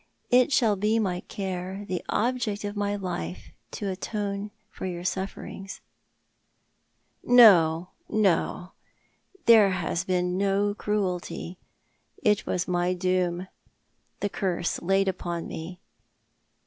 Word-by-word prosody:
It 250 +2 +5
shall 225 -6 +3
be 210 +3 +1
my 185 -5 0
care— 190 0 -4
the 180 -1 -3
object 230 -3 0
of 205 0 -4
my 205 0 -1
life 100 - -5 0.2
to 205 - -4
atone 200 +1 -3 0.2
for 195 - -6
your 175 -1 -5
.sufferings." 190 +1 -5 0.8
" - - -46 0.2
No, 170 -4 +6 0.2
no, 185 -3 +1 0.7
there 220 -4 +7
has 175 -1 -1
been 180 0 0
no 200 +1 +1
cruelty. 185 -4 -3 0.6
It 210 -2 +2
was 180 - -1
my 180 0 +1
doom 180 0 0 0.4
— - - -45
the 205 - 0
curse 180 -4 -2
laid 195 +2 +2
upon 175 -3 -3
me. 170 +3 -7
190 Hz, 120 wpm, -26 LUFS, 180-205 Hz, 0.8 s, there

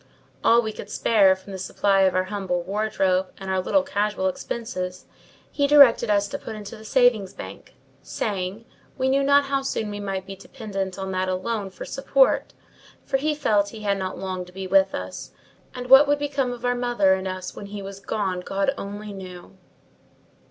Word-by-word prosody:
All 235 +1 +5
we 220 -1 -4
could 205 - -9
spare 200 -4 +4
from 190 +1 -13
the 190 - -6
supply 195 +1 +1
of 190 - +2
our 185 - +3
humble 185 -3 -3
wardrobe 195 -1 0
and 190 -1 -5
our 190 - +1
little 275 +10 +2
casual 210 -8 -1
expenses, 185 -2 -4 0.5
he 285 -1 +1
directed 280 -6 +6
us 205 -1 +2
to - - -4
put - - -7
into 210 -1 -8
the 220 - -12
savings' 230 -5 +2
bank; 95 +1 -10 0.3
saying, 200 +5 -4 0.3
we 260 -1 +1
knew 275 +1 +3
not 280 +1 +5
how 275 0 0
soon 220 -5 -3
we 205 - -5
might 195 -2 -4
be 195 0 -8
dependent 195 -3 -5
on 190 0 -4
that 185 0 -1
alone 195 +2 -2
for 190 - -9
support: 270 0 +2 0.5
for 270 - +1
he 300 +2 0
felt 210 -8 +2
he 220 +1 -10
had 200 -1 0
not 185 0 -4
long 185 -1 -4
to 180 - -15
be 190 +1 -6
with 290 +9 +3
us, - - -7 0.4
and 250 0 -6
what 270 +3 +8
would 290 0 +3
become 280 -3 -1
of 245 0 -6
our 245 - +2
mother 240 -6 +2
and 190 0 -2
us 185 0 -5
when 200 - -8
he 200 0 -7
was 195 0 -8
gone, 195 -2 -2
God 195 +7 -1
only 205 +1 -6
knew! 185 -1 -10
205 Hz, 195 wpm, -24 LUFS, 190-245 Hz, 0.5 s, what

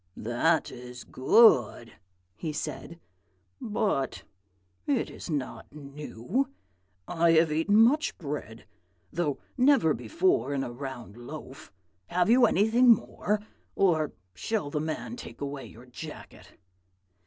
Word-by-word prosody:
"'That 120 +9 +1
is 125 0 -9
good,' 130 - +4 0.4
he 155 +9 -4
said; 165 +2 -6 0.6
'but 205 - -1 0.6
it 140 - 0
is - - -9
not 145 -5 -4
new. 150 - -4 0.6
I 170 -1 +3
have 160 -1 +4
eaten 165 +7 +1
much 275 +8 +3
bread, 140 - -6 0.5
though 160 -5 -1 0.2
never 255 - +5
before 370 - 0
in 135 - -1
a 120 - -5
round 120 -4 -8
loaf. 135 +2 -10 0.4
Have 180 +4 +2
you 245 0 +6
anything 225 +6 +4
more? 210 -1 +1 0.3
Or 160 -6 +2 0.2
shall 150 - -3
the 150 - -1
man 160 +9 -4
take - - -10
away 140 -1 -5
your 120 +2 -14
jacket?' 125 - -11
155 Hz, 120 wpm, -28 LUFS, 135-210 Hz, 0.6 s, you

